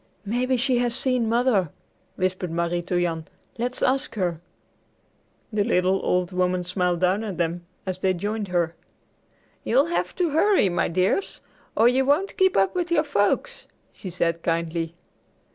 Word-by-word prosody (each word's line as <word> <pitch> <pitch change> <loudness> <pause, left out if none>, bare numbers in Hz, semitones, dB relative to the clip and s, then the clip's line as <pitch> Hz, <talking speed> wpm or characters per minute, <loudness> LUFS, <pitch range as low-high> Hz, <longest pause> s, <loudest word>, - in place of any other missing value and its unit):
"Maybe 250 +5 0
she 250 0 +2
has 240 -1 0
seen 250 -4 +1
Mother," 230 - +2 0.5
whispered 185 -1 -1
Marie 170 +1 -1
to 175 +1 -1
Jan. 165 -2 -2 0.3
"Let's 250 +1 -2
ask 270 +1 +1
her!" 175 -5 -1 1.1
The 210 -1 +2
little 190 -3 +1
old 180 0 +1
woman 180 0 0
smiled 180 -1 -1
down 185 +4 +2
at 200 -5 -5
them 170 0 -2 0.2
as 185 -1 -3
they 185 0 +1
joined 205 +3 -3
her. 175 -2 0 0.9
"You'll 265 +5 +3
have - - -1
to 350 -4 0
hurry, 325 - +4
my 175 -1 0
dears, 185 - 0 0.4
or 225 - +6
you 255 +2 +3
won't 295 +9 +1
keep 380 -1 +3
up 195 0 +3
with 355 -1 -1
your 310 -3 +3
folks," 290 - 0 0.3
she 190 - -8
said 170 -1 -1
kindly. 165 0 -2
190 Hz, 160 wpm, -24 LUFS, 175-250 Hz, 1.1 s, or